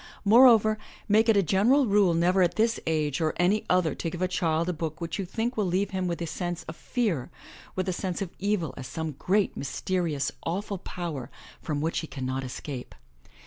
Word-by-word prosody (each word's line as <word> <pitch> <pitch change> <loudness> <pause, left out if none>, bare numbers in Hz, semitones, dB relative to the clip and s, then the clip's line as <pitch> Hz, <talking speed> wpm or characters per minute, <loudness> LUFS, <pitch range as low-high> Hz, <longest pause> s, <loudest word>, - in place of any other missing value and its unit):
Moreover, 220 -1 +6 0.3
make 220 +2 +4
it 220 - +5
a 200 - +4
general 225 - +4
rule 200 -5 +3
never 180 +3 +3
at 175 - +2
this 225 +1 +2
age 155 -2 0
or 155 -1 0
any 185 +5 +2
other 180 -3 +3
to 165 - -3
give 175 +2 -4
a - - +2
child 165 -2 0
a 180 - 0
book 160 0 -4
which 170 +2 -4
you 195 - -1
think 230 +6 -2
will 210 -3 0
leave 185 +3 0
him 185 -1 -1
with 170 -1 -2
a - - -2
sense 175 +1 -4
of 160 - -8
fear, 205 - -1 0.5
with 185 0 -1
a 185 - 0
sense 180 0 -3
of 190 -3 -4
evil 195 -7 0
as 130 - -6
some 160 +3 -4
great, 200 +2 +1
mysterious 150 0 -1
awful 195 +3 -3
power 165 -9 -5 0.3
from 150 -3 -2
which 160 +2 0
he 160 - -5
cannot 130 -1 -3
escape. 130 0 -7
180 Hz, 205 wpm, -27 LUFS, 160-200 Hz, 0.5 s, Moreover